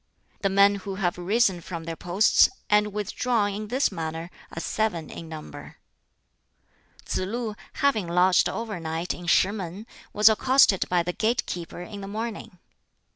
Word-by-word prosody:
"The 195 - +1
men 200 +1 +5
who 195 0 -6
have 180 -3 -1
risen 190 -1 +2
from 170 -1 -6
their 165 0 -5
posts 180 +6 +4 0.2
and 210 0 +4
withdrawn 210 +1 -1
in 210 +1 -5
this 255 +3 +1
manner 165 -1 -5 0.2
are - - -6
seven 175 -4 -2
in 165 - -9
number." 155 -1 -9 1.3
Tsz - - -2
lu, 215 +3 -3 0.2
having 245 -10 +1
lodged 180 +1 +3
overnight 175 -7 -3
in 175 -1 -9
Shih 185 +2 +4
mun, 195 0 -6 0.3
was 210 +1 +4
accosted 225 -2 +4
by 175 -1 +2
the 180 +1 -3
gate 230 +5 0
keeper 175 0 -6
in 205 +1 -8
the 195 - -7
morning. 215 -2 -5
195 Hz, 155 wpm, -25 LUFS, 175-215 Hz, 1.3 s, men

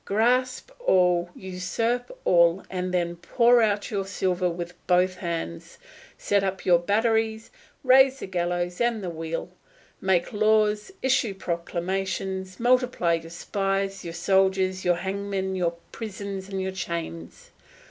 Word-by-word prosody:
Grasp 250 - +1
all, 180 - +3
usurp 195 +6 -2 0.2
all, 170 +1 +4
and 185 -1 -2
then 175 -1 0
pour 235 +7 +4
out 205 -2 0
your 200 -2 -1
silver 185 -2 0
with 175 +1 -5
both 185 +1 +3
hands; 165 - -5 0.4
set 200 -1 +1
up 190 -1 -3
your 175 -2 +5
batteries, 220 +3 0 0.3
raise 265 +1 +6
the - - -6
gallows 175 0 -2
and 235 -3 +1
the 180 - -3
wheel; 165 0 -5 0.5
make 190 -1 +1
laws, 215 - +2
issue 255 -6 +2
proclamations, 190 +2 -3
multiply 245 -7 +2
your 165 0 -3
spies, 195 +2 -2
your 170 -1 -6
soldiers, 190 -1 +2
your 175 -1 +3
hangmen, 190 +1 -3
your 170 -2 0 0.2
prisons, 200 -3 -6
and 195 -1 -3
your 190 - -2
chains. 170 - -6
190 Hz, 130 wpm, -25 LUFS, 175-210 Hz, 0.5 s, raise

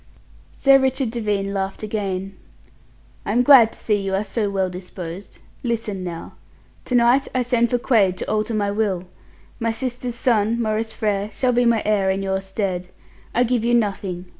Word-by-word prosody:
Sir 275 -1 +6
Richard 265 -2 0
Devine 205 -4 -2
laughed 195 +1 -3
again. 195 -3 -3 0.9
"I 205 - -2
am 245 +2 +3
glad 245 -4 +7
to - - -11
see 210 -2 0
you 195 0 -1
are 195 - 0
so 210 -1 -2
well 195 -1 0
disposed. 180 0 -8 0.2
Listen 225 -5 -3
now. 170 -2 -7 0.5
To 250 - -1
night 245 +3 +4
I 255 - +2
send 240 -1 +2
for 245 - +1
Quaid 210 -7 +2
to - - -4
alter 215 +1 -1
my 205 -1 0
will. 200 -4 -1 0.5
My 230 - 0
sister's 245 +1 -3
son, 230 -2 +1
Maurice 220 0 -1
Frere, 210 -3 -1
shall 255 +3 0
be 245 0 +3
my 230 -2 +3
heir 205 -2 +2
in 190 +1 0
your 190 0 -1
stead. 190 -2 -3 0.5
I 245 - +4
give 245 -1 0
you 240 +1 +3
nothing. 195 -5 -1
215 Hz, 180 wpm, -22 LUFS, 195-235 Hz, 0.9 s, glad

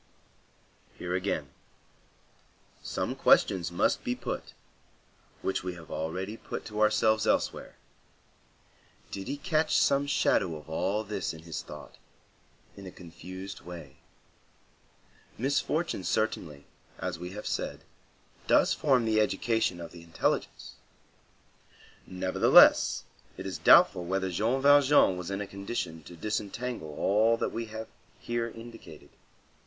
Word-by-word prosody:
Here, 90 0 -4
again, 90 -6 -2 1.3
some - - -3
questions 85 -3 +3
must 85 - +1
be - - -1
put, - - -5 0.9
which 95 - -1
we 90 -1 -4
have 85 -2 -12
already 95 +7 -4
put - - -7
to 105 0 -4
ourselves 110 0 +3
elsewhere: - - 0 1.4
did 95 -1 -6
he 140 +2 -3
catch 155 +1 +1
some 140 +1 +3
shadow 95 - +2
of 75 - -11
all 95 +6 -1
this 100 -5 -4
in 80 - -12
his 80 -2 -5
thought, 75 0 -11 0.8
in 100 -1 -10
a - - -8
confused 95 +3 -9
way? 85 -6 -10 1.4
Misfortune 140 - -1
certainly, 80 -8 -2 0.3
as 90 -2 -4
we 90 +1 -6
have 105 - -7
said, - - -3 0.6
does - - +4
form 130 -6 +2
the 110 -1 +3
education 105 -2 0
of 85 - -8
the 85 - -12
intelligence; 85 -1 -2 1.3
nevertheless, 95 0 +5 0.3
it - - -7
is - - -4
doubtful 90 - +6
whether 95 +1 -1
Jean 115 +9 0
Valjean 145 -7 +6
was 90 0 -6
in 100 +1 -3
a - - -3
condition 100 -4 -5
to 85 - -11
disentangle 105 -2 -4
all 110 +3 +3
that - - -1
we 115 0 -4
have 110 +1 -7 0.3
here 120 0 -2
indicated. 115 -9 -12
100 Hz, 125 wpm, -29 LUFS, 85-115 Hz, 1.4 s, doubtful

